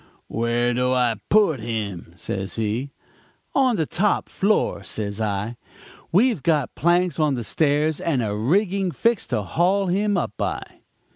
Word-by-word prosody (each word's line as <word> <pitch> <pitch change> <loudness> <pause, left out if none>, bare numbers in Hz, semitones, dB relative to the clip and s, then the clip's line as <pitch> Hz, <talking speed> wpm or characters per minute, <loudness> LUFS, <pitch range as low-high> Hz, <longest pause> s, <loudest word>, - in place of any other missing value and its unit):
"'Where 120 +1 0
do 125 +1 +1
I 120 -3 +2
put 200 - +4
him?' 105 -7 -4
says 95 +3 -4
he. 115 +5 -2 0.6
"'On 260 -3 +3
the 160 - 0
top 205 +7 0
floor,' 205 +2 +1
says 105 0 -4
I. 105 +2 -2 0.5
'We've 215 - +3
got 150 -2 +1
planks 175 +1 +1
on 150 -3 +2
the 120 - -3
stairs 150 +4 +1
and 140 -8 0
a 105 -1 -2
rigging 190 - +1
fixed 230 +5 0
to - - 0
haul 190 +4 +1
him 205 +2 +1
up 175 - -1
by.' - - -4
145 Hz, 150 wpm, -23 LUFS, 115-185 Hz, 0.6 s, put